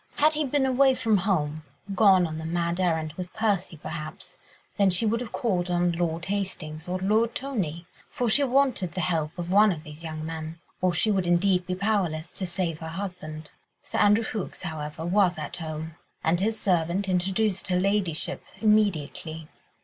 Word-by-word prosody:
Had 305 +2 +4
he 305 0 0
been 275 0 +1
away 265 0 +4
from 220 -4 +2
home, 155 -6 0 0.3
gone 195 -3 +6
on 160 -1 -4
the - - -6
mad 170 +1 -1
errand 160 -4 0
with 180 +1 -6
Percy, 200 -6 0
perhaps, 155 0 -7 0.4
then 200 -2 +5
she 185 +5 +2
would 230 +2 +1
have 240 - -6
called 185 -6 0
on 175 0 +2
Lord 170 0 -1
Hastings 180 -5 -4
or 180 +1 -1
Lord 220 +5 +1
Tony—for 205 - -4
she 275 +6 +3
wanted 255 -9 +2
the 185 - -2
help 160 -2 0
of 175 0 -4
one 210 +2 +6
of 155 -4 -5
these 150 0 -11
young 155 -1 -5
men, 160 0 -5 0.2
or 185 0 +3
she 215 +6 +2
would 190 -3 +1
be - - -1
indeed 180 0 +2
powerless 180 -6 0
to 190 - -4
save 175 -3 -2
her 160 - -6
husband. 160 -4 -6 0.3
Sir - - -3
Andrew 210 +2 +5
Ffoulkes, 215 -4 -5
however, 155 -1 -5
was 180 -1 +3
at 155 - -5
home, 160 -1 -5 0.3
and 165 +2 +2
his 220 +3 0
servant 180 +1 +1
introduced 190 +2 0
her 180 -1 +2
ladyship 195 -4 0 0.2
immediately. 165 -7 +1
180 Hz, 180 wpm, -26 LUFS, 160-205 Hz, 0.4 s, gone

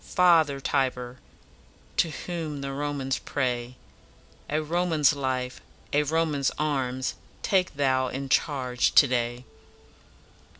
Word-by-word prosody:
father 160 -6 +4
Tiber! 130 -2 -1 0.8
To 165 - +3
whom 155 -2 -5
the 135 0 -4
Romans 140 -2 -2
pray, 125 -3 -2 0.7
A 150 - +1
Roman's 155 -2 +2
life, 130 -2 -3 0.3
a 145 - +4
Roman's 150 -2 +1
arms, 130 -4 -1 0.3
Take 185 -4 +1
thou 130 -2 +2
in 135 +2 -4
charge 130 -4 +1
to - - +9
day.'" 120 0 -1
140 Hz, 110 wpm, -26 LUFS, 130-155 Hz, 0.8 s, to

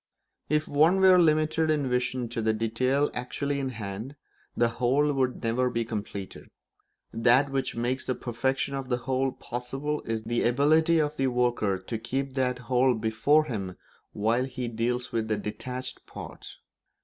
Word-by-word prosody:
If 150 +1 +1
one 160 +6 +4
were 185 -1 +7
limited 155 -1 +3
in 150 -3 +1
vision 125 0 -1
to 115 0 -3
the 110 0 +2
detail 125 +6 +1
actually 140 +3 -2
in 135 -1 -2
hand, 110 +3 -6 0.4
the 120 - +4
whole 130 +5 +1
would 130 -2 -1
never 125 +3 +1
be 115 -1 -1
completed; 105 -3 -6 0.7
that 125 +5 +4
which 135 -1 -2
makes 125 +3 -2
the 130 - 0
perfection 130 +3 -1
of 135 -1 -4
the 125 - +1
whole 135 0 +1
possible 135 +6 -4
is 110 -1 -2
the 120 +1 -1
ability 155 +7 +3
of 150 -1 0
the 135 - +2
worker 120 -6 +1
to 95 +5 -5
keep 135 +4 -3
that 130 -2 0
whole 130 0 +3
before 110 +8 +3
him 100 -10 -5 0.3
while 115 +5 +1
he 125 -2 -4
deals 120 +2 -2
with 110 -1 -1
the 110 -1 0
detached 125 +5 -6
parts. - - -9
125 Hz, 160 wpm, -27 LUFS, 115-140 Hz, 0.7 s, were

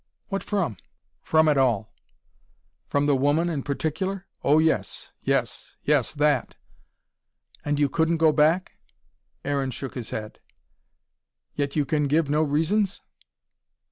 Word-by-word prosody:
"What 195 -1 -2
from?" 170 - -1 0.4
"From 160 0 +3
it 145 -3 +4
all." 115 -6 +1 0.9
"From 145 0 +1
the 145 -1 +3
woman 145 +6 +2
in 150 -5 -2
particular?" 160 +8 -3 0.2
"Oh, 145 +2 +4
yes. 155 -12 0
Yes. - - -2
Yes, 145 -5 +2
that." 145 -3 +1 1.1
"And 145 0 -1
you 145 - +4
couldn't 160 +4 +1
go 160 -1 +5
back?" 160 +5 +2 0.7
Aaron 140 -1 0
shook 130 +1 -6
his 120 -4 -6
head. 110 0 -6 1.1
"Yet 140 -1 -2
you 150 -2 +2
can 150 0 +1
give 150 0 +1
no 150 +1 +3
reasons?" 165 +7 +1
150 Hz, 130 wpm, -25 LUFS, 140-160 Hz, 1.1 s, go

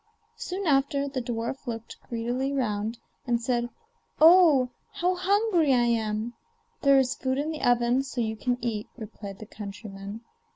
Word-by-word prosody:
Soon 380 +2 -4
after 280 -1 +2
the 270 -2 -3
dwarf 235 +3 -4
looked 230 -1 -6
greedily 245 +3 -1
round, 225 -4 -1 0.3
and 240 -1 +2
said: 240 0 -1 0.5
'Oh! 315 -6 +7 0.2
how 360 +1 +1
hungry 365 - +2
I 240 - +3
am!' 225 0 -1 0.5
'There 275 -1 +6
is 260 -2 +3
food 260 0 -2
in 300 +3 -1
the 310 - -6
oven, 245 +1 +3
so 270 -2 -6
you 220 -1 0
can 245 +3 -1
eat,' 220 -3 -2
replied 210 -3 -8
the 215 - -9
countryman. 200 0 -8
245 Hz, 155 wpm, -27 LUFS, 225-280 Hz, 0.5 s, Oh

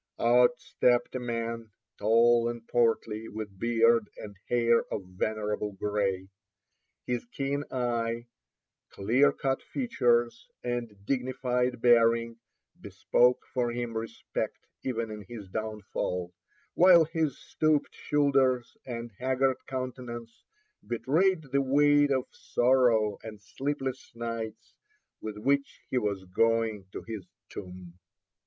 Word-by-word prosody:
Out 125 +6 +4
stepped 120 -1 +1
a 130 - -2
man, 115 -2 -3 0.3
tall 115 +2 +4
and 120 -1 -7
portly, 115 -2 +1
with 105 -3 -7
beard 115 -1 +3
and 105 -1 -9
hair 120 -1 +4
of 100 - -3
venerable 105 +2 -2
gray. 95 -2 -1 0.8
His 125 -1 -2
keen 140 +3 -2
eye, 120 -2 -1 0.6
clear 125 +8 +3
cut 135 -1 -1
features, 120 - 0
and 120 -5 -4
dignified 125 -1 -1
bearing, 115 -1 +4 0.4
bespoke 125 +1 +2
for 120 -2 0
him 120 -1 -4
respect 115 0 -4 0.3
even 115 -3 -2
in 105 -1 -7
his 105 -5 -8
downfall, 100 -4 -3 0.4
while 175 -1 +7
his 155 -4 -1
stooped 155 -2 0
shoulders 135 -4 +1
and 120 -1 -5
haggard 130 +1 +1
countenance 125 -3 -6 0.4
betrayed 160 +9 +1
the 140 - +3
weight 145 +2 +4
of 130 -2 +1
sorrow 120 -4 +2
and 110 -2 -9
sleepless 135 +5 -4
nights 115 -2 -5 0.5
with 110 -1 -6
which 140 +5 0
he 130 - +2
was 100 -4 -2
going 110 +1 +1
to - - -7
his 110 -5 -7 0.2
tomb. 90 -2 -10
120 Hz, 115 wpm, -29 LUFS, 110-130 Hz, 0.8 s, while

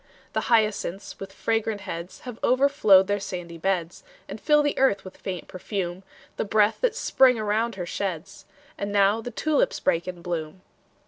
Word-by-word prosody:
The - - -2
hyacinths, 215 -4 0
with 195 - -7
fragrant 225 -2 -1
heads, 175 -2 -7
Have 245 -3 -8
overflowed 255 -7 +5
their 205 +1 0
sandy 175 -3 -6
beds, 175 -2 -2 0.2
And - - -8
fill 300 -1 +4
the 290 - 0
earth 205 -8 +2
with 185 - -10
faint 185 -3 -6
perfume, 185 -1 -4 0.4
The - - 0
breath 210 +1 +2
that - - +1
Spring 260 - +4
around 215 +1 0
her 180 -2 -4
sheds. 190 -1 -5 0.3
And 200 0 -3
now 200 +2 +3
the 245 - -6
tulips 305 +3 0
break 170 +1 0
in 180 -2 -7
bloom! 170 0 -4
200 Hz, 170 wpm, -25 LUFS, 180-225 Hz, 0.4 s, overflowed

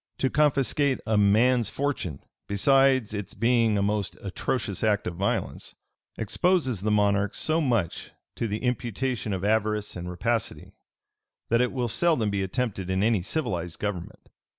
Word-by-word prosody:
To 130 - 0
confiscate 140 -2 +2
a 110 - +1
man's 110 +3 +4
fortune, 130 - -3 0.2
besides 130 +2 +3
its 105 +3 -5
being 115 -1 +2
a 100 - +1
most 100 -4 -1
atrocious 100 +1 -2
act 105 -2 +2
of 90 - -3
violence, 100 +3 -2 0.4
exposes 130 - +1
the 105 - 0
monarch 100 -1 +2
so 160 +1 0
much 115 - -1 0.3
to 115 - -2
the 105 +3 -4
imputation 125 -1 -2
of 95 0 -2
avarice 105 -1 0
and 90 0 -5
rapacity, 110 +5 -2 0.8
that 115 +1 +3
it 125 - +1
will 125 -3 -1
seldom 115 -2 +2
be 100 -1 -1
attempted 95 -2 -2
in 95 +1 +1
any 110 -3 +2
civilized 90 - -3
government. 105 -5 -5
110 Hz, 150 wpm, -26 LUFS, 100-125 Hz, 0.8 s, man's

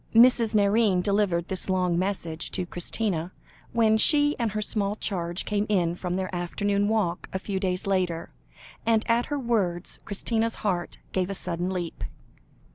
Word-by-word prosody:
Mrs. 230 -2 +6
Nairne 200 -2 +3
delivered 195 -4 +1
this 190 0 -3
long 180 -2 +1
message 175 -4 -2
to 180 - 0
Christina, 175 0 -2 0.4
when 220 -2 +3
she 290 +5 +5
and 230 -3 0
her 215 - -1
small 205 -1 -1
charge 175 -4 -2
came 210 0 0
in 175 -5 +2
from 180 0 -3
their 185 0 -3
afternoon 200 +3 0
walk 205 -5 0
a - - -1
few 190 0 -3
days 185 -1 -1
later, 180 -4 -1 0.5
and 225 -1 +2
at 235 +1 +2
her 290 - -2
words, 205 -9 -1
Christina's 225 +2 -1
heart 180 -4 -1
gave 185 0 0
a 195 - -3
sudden 175 0 -2
leap. 180 -3 -4
195 Hz, 160 wpm, -26 LUFS, 180-220 Hz, 0.5 s, Mrs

